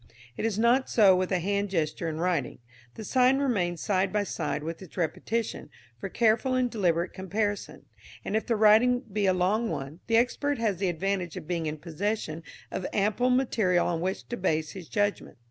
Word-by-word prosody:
It 225 Hz, -, -1 dB
is 210 Hz, -3 st, -2 dB
not 240 Hz, +4 st, +3 dB
so 200 Hz, -5 st, +6 dB
with 185 Hz, +1 st, -1 dB
a 185 Hz, -, +3 dB
hand 200 Hz, +3 st, -1 dB
gesture 165 Hz, -2 st, -1 dB
in 155 Hz, -, -4 dB
writing. 165 Hz, -6 st, -1 dB, 0.4 s
The -, -, -7 dB
sign 255 Hz, +3 st, +3 dB
remains 185 Hz, -, 0 dB
side 190 Hz, -2 st, +1 dB
by 210 Hz, -1 st, +1 dB
side 150 Hz, -6 st, -3 dB
with 165 Hz, +2 st, -5 dB
its 185 Hz, -, -13 dB
repetition, 215 Hz, +6 st, -2 dB, 0.3 s
for 195 Hz, -, -5 dB
careful 235 Hz, +5 st, +2 dB
and 250 Hz, -1 st, +1 dB
deliberate 175 Hz, -4 st, 0 dB
comparison; 205 Hz, +2 st, -3 dB, 0.4 s
and 205 Hz, -, -2 dB
if 220 Hz, -, -1 dB
the 235 Hz, -, +2 dB
writing 220 Hz, +4 st, +5 dB
be 210 Hz, -4 st, -2 dB
a 185 Hz, -, +4 dB
long 210 Hz, +6 st, +1 dB
one, 140 Hz, +1 st, -5 dB
the 230 Hz, -1 st, +3 dB
expert 280 Hz, +4 st, +1 dB
has 220 Hz, -5 st, 0 dB
the 190 Hz, 0 st, 0 dB
advantage 180 Hz, 0 st, -2 dB
of -, -, -8 dB
being 170 Hz, -2 st, -2 dB
in 155 Hz, +1 st, -3 dB
possession 165 Hz, +1 st, -3 dB, 0.3 s
of 185 Hz, -, -3 dB
ample 215 Hz, +5 st, +1 dB
material 225 Hz, -8 st, +2 dB
on 170 Hz, -2 st, -1 dB
which 190 Hz, +2 st, -3 dB
to 240 Hz, -, -3 dB
base 155 Hz, -4 st, 0 dB
his 180 Hz, -5 st, -10 dB
judgment. 205 Hz, -1 st, -1 dB
195 Hz, 195 wpm, -27 LUFS, 175-225 Hz, 0.4 s, so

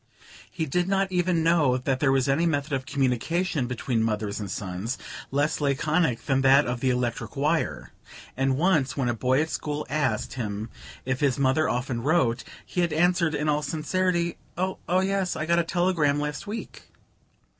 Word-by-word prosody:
He 165 Hz, -3 st, -3 dB
did 175 Hz, +5 st, 0 dB
not 195 Hz, 0 st, +1 dB
even 175 Hz, -2 st, +1 dB
know 160 Hz, -6 st, +3 dB
that 130 Hz, 0 st, -1 dB
there 140 Hz, -1 st, +3 dB
was 135 Hz, -1 st, +2 dB
any 150 Hz, +5 st, +2 dB
method 145 Hz, -2 st, -1 dB
of 135 Hz, 0 st, -2 dB
communication 140 Hz, +3 st, 0 dB
between 120 Hz, -1 st, -1 dB
mothers 105 Hz, -2 st, -1 dB
and 100 Hz, -2 st, -5 dB
sons 95 Hz, +5 st, -4 dB, 0.3 s
less 145 Hz, +3 st, 0 dB
laconic 145 Hz, -1 st, +1 dB
than 135 Hz, -1 st, +2 dB
that 135 Hz, +2 st, +6 dB
of 125 Hz, 0 st, -2 dB
the 130 Hz, -, +1 dB
electric 120 Hz, -3 st, -2 dB
wire; 150 Hz, +4 st, -1 dB, 0.4 s
and 135 Hz, 0 st, +1 dB
once, 155 Hz, -6 st, +2 dB
when 130 Hz, -3 st, +1 dB
a -, -, +1 dB
boy 130 Hz, +5 st, +2 dB
at 160 Hz, -, -6 dB
school 150 Hz, 0 st, -3 dB
asked 135 Hz, -7 st, 0 dB
him 110 Hz, -3 st, -4 dB, 0.3 s
if 130 Hz, 0 st, -1 dB
his 140 Hz, -4 st, +2 dB
mother 140 Hz, +3 st, +2 dB
often 125 Hz, -1 st, -2 dB
wrote, 130 Hz, -4 st, +2 dB, 0.2 s
he 180 Hz, -, -2 dB
had 170 Hz, -3 st, 0 dB
answered 170 Hz, -1 st, +2 dB
in 150 Hz, +1 st, -1 dB
all 150 Hz, 0 st, +2 dB
sincerity: 170 Hz, +3 st, -1 dB, 0.2 s
"Oh 185 Hz, +1 st, -1 dB, 0.2 s
yes 195 Hz, -1 st, 0 dB
I 155 Hz, -, -2 dB
got 170 Hz, +1 st, +3 dB
a -, -, +2 dB
telegram 165 Hz, -4 st, +1 dB
last 150 Hz, +6 st, -4 dB
week." 220 Hz, +2 st, -7 dB
145 Hz, 175 wpm, -26 LUFS, 130-170 Hz, 0.4 s, that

